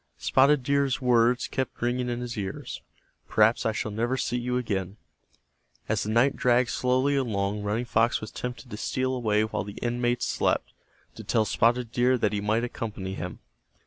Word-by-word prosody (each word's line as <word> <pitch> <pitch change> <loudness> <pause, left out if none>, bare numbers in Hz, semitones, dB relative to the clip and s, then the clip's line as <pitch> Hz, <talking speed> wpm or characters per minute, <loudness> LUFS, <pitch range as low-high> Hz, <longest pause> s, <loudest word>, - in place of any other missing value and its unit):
Spotted 135 +1 +3
Deer's 140 0 +1
words 120 0 +3
kept 130 -2 -3
ringing 125 +1 -1
in 120 0 -3
his 120 -1 -5
ears: 95 -2 -5 0.5
"Perhaps 110 +2 +3
I - - +2
shall 110 0 -3
never 120 +5 -1
see 120 - -1
you 125 +1 -1
again." 100 -5 -3 0.9
As - - 0
the 105 - -3
night 120 +5 +3
dragged 125 -1 +3
slowly 130 +3 +1
along 105 -6 -1
Running 105 +4 -1
Fox 115 0 +2
was 110 - -8
tempted 125 0 -6
to 105 - -5
steal 130 +3 -1
away 110 -4 +1
while 110 -5 -2
the 100 0 -9
inmates 120 0 0
slept, - - 0 0.4
to - - -9
tell 110 -1 +1
Spotted 120 +2 +1
Deer 125 +2 +3
that 105 -3 0
he 100 - -1
might 110 +3 +1
accompany 105 -5 -4
him. 90 -1 -6
120 Hz, 175 wpm, -27 LUFS, 105-125 Hz, 0.9 s, Spotted